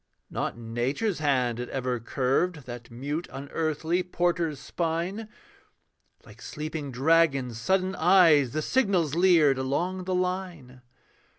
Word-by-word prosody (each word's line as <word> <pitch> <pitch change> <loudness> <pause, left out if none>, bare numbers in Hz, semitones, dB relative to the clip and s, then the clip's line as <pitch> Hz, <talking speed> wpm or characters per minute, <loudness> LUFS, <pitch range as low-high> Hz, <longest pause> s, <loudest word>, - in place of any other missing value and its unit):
Not - - -3
Nature's 120 - -2
hand 130 -6 +1
had 125 - -5
ever 125 -2 -2
curved 135 +6 -1
That 120 -1 -9
mute 145 +8 -4
unearthly 160 +5 -2
porter's 175 -4 -1
spine. 175 +6 -3 1.0
Like - - -15
sleeping 150 -2 -5
dragon's 135 -3 +2
sudden 190 +7 +1
eyes 165 -7 +5
The 155 0 -1
signals 190 - +1
leered 165 -6 +4
along 175 +8 -2
the 185 0 -1
line. 180 -8 -3
155 Hz, 115 wpm, -27 LUFS, 130-180 Hz, 1.0 s, eyes